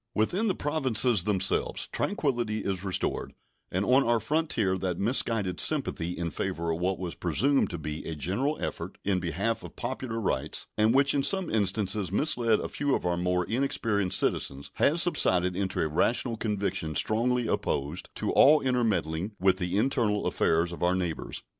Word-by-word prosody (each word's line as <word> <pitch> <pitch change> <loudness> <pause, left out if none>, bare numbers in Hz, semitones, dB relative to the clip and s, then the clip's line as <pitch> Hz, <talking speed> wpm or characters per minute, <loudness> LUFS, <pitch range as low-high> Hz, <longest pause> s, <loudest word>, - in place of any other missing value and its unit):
Within 180 - +1
the 195 - +1
Provinces 125 - +2
themselves 100 -3 0
tranquillity 120 - -1
is 95 -2 -3
restored, 95 -1 -2 0.4
and 95 +3 0
on 130 +4 +4
our 120 -2 +2
frontier 115 -6 0
that 90 -2 -2
misguided 105 -4 0
sympathy 90 - 0
in 85 -1 -3
favor 85 -3 -3
of 80 - -2
what 90 +1 0
was 90 -2 -5
presumed 130 - +1
to 85 - -4
be 75 0 -5
a 80 - -4
general 105 - -1
effort 85 +3 -5
in 95 -2 +1
behalf 95 +7 -1
of - - -10
popular 120 -2 -4
rights, 75 -8 -2
and 110 +3 +3
which 140 0 +4
in 140 - +2
some 190 +4 +2
instances 100 -2 0
misled 115 -2 +2
a - - -3
few 145 -2 -1
of - - -4
our 90 0 +1
more 90 0 0
inexperienced 110 -6 0
citizens, 70 +1 -1
has 165 +4 +4
subsided 90 - +2
into 95 0 -2
a 80 - +1
rational 115 - 0
conviction 100 -7 -2
strongly 120 +2 +1
opposed 75 -5 -2
to - - -1
all 150 +2 +6
intermeddling 110 - -1
with 95 0 +3
the 90 0 -2
internal 110 -3 +1
affairs 85 +2 +1
of 85 - -8
our 90 +1 +2
neighbors. 90 -3 -4
100 Hz, 170 wpm, -28 LUFS, 90-125 Hz, 0.4 s, all